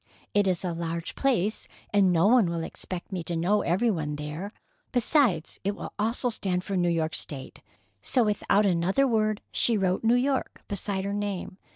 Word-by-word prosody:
It 205 -1 +3
is 185 0 0
a 175 - -1
large 165 0 -4
place, 220 -6 0 0.3
and 195 -3 +5
no 170 +1 +3
one 225 -4 +5
will 170 -1 -2
expect 180 +3 -6
me 180 -3 -3
to 170 - -2
know 190 +6 +2
every 195 +7 +2
one 150 -5 -2
there. 150 +7 -5 0.4
Besides, 245 - +2
it 200 +1 -1
will - - -7
also 230 +4 0
stand 185 -5 -2
for 195 - -3
New 175 -1 +2
York 160 -2 0
State." 135 -3 -6 0.4
So, 250 - +2
without 210 -1 +2
another 190 +8 +2
word, 215 -3 +1
she 230 -2 +3
wrote 190 0 0
"New 230 +2 +4
York" 265 +1 -1
beside 200 -1 -3
her 200 - -2
name. 200 -2 -4
195 Hz, 185 wpm, -27 LUFS, 170-215 Hz, 0.4 s, and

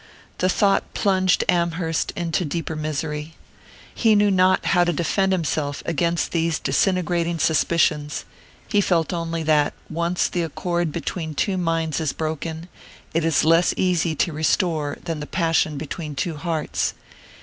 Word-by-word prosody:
The 185 - +2
thought 195 +1 +1
plunged 185 -3 +2
Amherst 170 -2 0
into 170 +1 -1
deeper 160 0 -3
misery. 150 0 -4 0.6
He 225 -3 +3
knew 205 0 +4
not 185 0 +3
how 175 -2 +4
to 175 - +1
defend 180 +4 +1
himself 155 -5 -1
against 170 +1 0
these 165 -1 +1
disintegrating 170 +2 0
suspicions 155 -2 +1 0.4
he 205 - +2
felt 170 -3 +1
only 165 -1 -2
that, 150 -2 +2 0.2
once 170 +2 0
the 175 - -2
accord 170 +1 -2
between 160 0 -4
two 195 +6 0
minds 165 -4 0
is 155 -4 -1
broken, 160 +1 -4 0.5
it 165 0 +1
is 165 -2 +2
less 165 +2 +4
easy 175 -3 +1
to 170 +2 0
restore 155 -1 0
than 165 -3 -3
the 150 - -6
passion 165 -4 +1
between 150 +1 -5
two 165 +3 -2
hearts. 160 0 -2
165 Hz, 145 wpm, -23 LUFS, 155-175 Hz, 0.6 s, knew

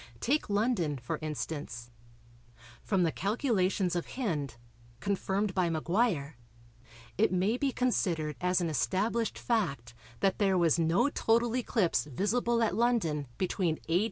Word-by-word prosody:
Take 285 - 0
London, 200 - +1
for 120 -1 -4
instance. 145 -5 -5 0.9
From 190 -3 +1
the 165 - +2
calculations 195 - 0
of 175 - -3
Hind, 150 - -2 0.4
confirmed 195 +4 -1
by 180 -2 +1
Maguire, 165 - 0 0.8
it 220 - +4
may 185 +5 +1
be 270 +2 0
considered 170 - 0
as 180 0 +2
an 170 - 0
established 215 - 0
fact 140 - -1 0.3
that 195 - +1
there 195 -3 +3
was 170 -2 +3
no 165 - +3
total 235 -1 +2
eclipse 225 -10 +1
visible 230 - 0
at 220 - +1
London 205 - +1
between 180 -3 0
A. 170 +2 +4
185 Hz, 130 wpm, -30 LUFS, 160-225 Hz, 0.9 s, it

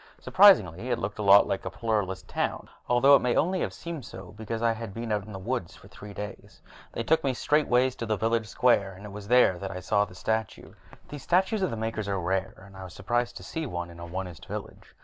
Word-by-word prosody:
Surprisingly, 125 - +5
it 120 - +1
looked 105 -2 -5
a - - -1
lot 100 0 +7
like 95 - -3
a - - -4
Pluralist 95 -5 -2
town, - - -3 0.2
although 130 +3 +6
it - - +5
may 125 -1 +1
only 185 +4 +1
have - - -2
seemed 170 -5 -7
so 95 -3 -10
because 110 +1 -5
I 115 - +4
had 110 -3 -6
been 115 -1 -4
out 105 -2 -1
in - - -9
the 95 - -6
woodlands 95 -2 -4
for - - -16
three 105 +1 -11
days. 105 0 -9 0.3
They 115 - -4
took 160 +6 +2
me 135 -2 0
straightways 130 -3 +2
to 115 - -4
the 110 -1 0
village 115 +1 0
square, 105 -5 +2
and 95 +3 -12
it 105 - -8
was 100 0 -9
there 120 -7 +4
that 95 - -5
I 90 - -6
saw 100 +2 +1
the 90 - -15
statue. 110 +2 -3 0.4
These 145 -2 -8
statues 190 - +1
of 185 - +1
the 115 - -4
Makers 110 -1 -3
are 100 -1 -1
rare, 95 +2 -2
and 100 -1 -16
I 95 - -9
was 90 -1 -10
surprised 120 +4 -1
to 90 - -10
see 160 - -4
one 85 -5 -5
in 85 - -13
an 85 0 -8
Onist 90 -2 -6
village. - - -8
110 Hz, 245 wpm, -27 LUFS, 95-125 Hz, 0.4 s, lot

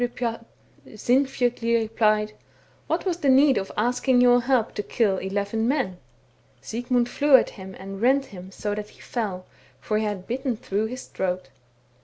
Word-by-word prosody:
' - - +3 0.9
Sinfjotli 245 -1 +1
replied, 215 -1 +1 0.3
' - - -33
What - - -1
was 360 -3 0
the 285 -5 +1
need 270 -1 +5
of 195 - -6
asking 245 +3 +2
your 245 0 +5
help 250 -3 +1
to - - -2
kill 205 -2 0
eleven 200 +4 -1
men? 250 -10 -1 0.2
' - - -36
" - - -37
Sigmund 245 +1 -1
flew 285 +2 +4
at 255 - +4
him 190 -1 -10
and 195 +1 -8
rent 270 +3 +3
him 185 -4 -11
so 205 +2 -3
that 210 0 -5
he - - -20
fell, 195 -6 -4 0.3
for 215 0 -1
he - - -1
had 205 -3 -3
bitten 255 0 -2
through 210 +1 -2
his 255 +3 -7
throat. 185 -1 -3
225 Hz, 180 wpm, -25 LUFS, 205-250 Hz, 0.9 s, need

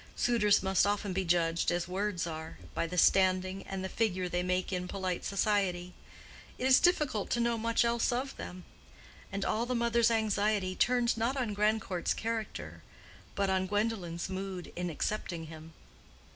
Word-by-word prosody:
Suitors 210 -5 +3
must 190 +1 +3
often 205 -1 -1
be 190 +1 0
judged 170 -1 +2
as 175 0 -1
words 190 -1 -1
are, 160 -1 -6 0.2
by 165 - -1
the 180 +2 -5
standing 185 +1 +3
and 195 -1 -4
the - - -2
figure 185 -3 0
they 175 0 -1
make 180 +1 -1
in 180 0 -2
polite 185 -2 -3
society: 195 -3 0 0.6
it 255 - -3
is 260 0 +7
difficult 300 - +2
to 240 - 0
know 235 0 +2
much 230 +1 +1
else 235 0 +1
of 260 +3 -2
them. 180 0 -8 0.7
And 195 0 -2
all 230 +3 0
the 250 - -1
mother's 235 0 +3
anxiety 210 -3 +1
turned 245 +1 +2
not 235 +5 0
on 240 -5 -1
Grandcourt's 205 -3 0
character, 225 -1 -4 0.5
but 195 -1 +1
on 190 0 +1
Gwendolen's 205 -5 -1
mood 190 -1 -5
in 180 0 -2
accepting 170 0 -3
him. 160 0 -11
195 Hz, 165 wpm, -31 LUFS, 180-225 Hz, 0.7 s, is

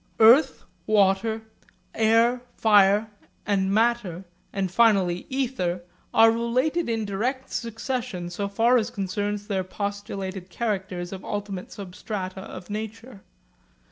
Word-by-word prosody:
Earth, 235 +7 +6 0.2
water, 215 +1 +2 0.5
air, 230 +2 +3 0.2
fire, 210 0 +4 0.3
and 195 -2 +1
matter, 215 -5 +1 0.3
and 195 -2 -2
finally 190 -5 +3
ether 245 -10 -1 0.3
are 225 0 +6
related 250 +8 0
in 225 -2 -1
direct 250 +7 -2
succession 230 -5 -4
so 200 +3 -3
far 230 +5 +3
as 225 -1 0
concerns 205 -1 -3
their 195 -3 -1
postulated 195 -1 -5
characters 190 -4 -3
of 190 - -8
ultimate 200 -3 -5
substrata 190 0 -6
of 185 -1 -9
nature. 220 +1 -7
205 Hz, 110 wpm, -25 LUFS, 190-230 Hz, 0.5 s, Earth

